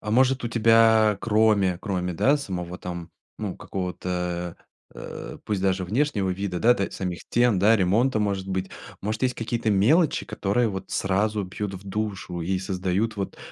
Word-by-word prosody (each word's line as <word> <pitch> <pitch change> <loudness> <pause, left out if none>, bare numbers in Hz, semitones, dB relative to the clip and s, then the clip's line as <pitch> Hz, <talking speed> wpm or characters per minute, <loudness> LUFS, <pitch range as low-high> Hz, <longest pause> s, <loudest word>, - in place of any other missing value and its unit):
А 105 - -5
может 130 +3 +3
у 120 - -1
тебя 115 -2 +5
кроме, 105 -5 +3
кроме, 90 -3 -2
да, 140 - +3
самого 90 -9 -5
там, 85 -1 -6 0.3
ну, 105 -4 -4
какого-то, 90 -1 -4 0.4
э, - - -8
э, - - -12
пусть 100 -3 -2
даже 95 -1 +1
внешнего 105 -2 0
вида, 90 -1 -3
да, 120 +5 +5
та 100 - -2
самих 90 -2 -4
стен, 120 -5 +2
да, 110 +3 +5
ремонта, 110 +6 +2
может 100 -2 -1
быть. 95 0 -2 0.3
Может, 105 +3 -3
есть 125 -1 +2
какие-то 115 -1 -1
мелочи, 135 - +3
которые 110 +1 0
вот 95 -2 -6
сразу 105 +2 0
бьют 100 +1 -5
в 95 +2 -9
душу 95 -4 -3
и 90 +3 -1
создают 95 +3 -1
вот 100 -1 -4
100 Hz, 170 wpm, -25 LUFS, 90-110 Hz, 0.4 s, тебя